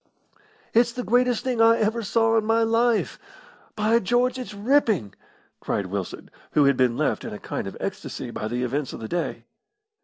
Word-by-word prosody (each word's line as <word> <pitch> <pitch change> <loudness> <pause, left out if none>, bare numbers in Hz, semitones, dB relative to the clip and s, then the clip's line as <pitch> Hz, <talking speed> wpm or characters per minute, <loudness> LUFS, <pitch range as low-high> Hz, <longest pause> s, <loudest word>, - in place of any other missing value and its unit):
"It's 235 +1 +4
the 250 - -4
greatest 245 0 +2
thing 250 -3 0
I 230 0 +6
ever 220 +2 0
saw 225 +1 +2
in 225 - +3
my 225 +1 +2
life. 230 0 +1 0.6
By 220 +2 +3
George, 245 +4 +1
it's 245 -5 -6
ripping!" 210 - +1 0.5
cried 100 - -2
Wilson, 95 0 -5 0.2
who 145 - +4
had 140 -1 +4
been 125 -2 +2
left - - 0
in - - -6
a - - -5
kind - - -5
of - - -7
ecstasy - - -5
by 110 - -4
the 120 +2 -2
events 135 +2 -2
of - - -7
the 110 - -6
day. 175 +5 -3
225 Hz, 185 wpm, -24 LUFS, -, 0.6 s, I